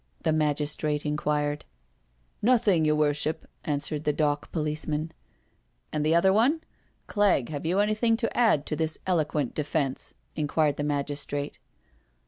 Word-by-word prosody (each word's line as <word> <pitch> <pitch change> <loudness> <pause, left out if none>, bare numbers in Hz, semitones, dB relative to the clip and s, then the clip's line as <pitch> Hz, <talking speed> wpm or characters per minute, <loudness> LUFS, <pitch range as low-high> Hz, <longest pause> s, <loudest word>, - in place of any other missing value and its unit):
the 155 - +2
magistrate 150 0 0
inquired. 150 0 0
•• - - -18 0.8
Nothing, 210 -8 +3
your 150 0 +3
worship," 150 +1 0 0.2
answered 150 0 -2
the 150 - +2
dock 145 -1 -1
police 155 -2 -1
man. 155 +1 -1
*^« - - -23 0.4
" - - -32
And 150 -1 0
the 155 +2 +3
other 190 +3 +4
one? 260 +10 +3 0.4
Clegg, 200 - +2
have 150 +1 -4
you 180 +3 +1
anything 215 +2 +2
to 230 -1 -2
add 220 -12 +3
to 155 - -2
this 160 0 -1
eloquent 155 -7 0
defence?" 145 -2 -2 0.2
inquired 150 -1 +1
the 145 - -2
magistrate. 145 0 -2
150 Hz, 150 wpm, -27 LUFS, 145-170 Hz, 0.8 s, other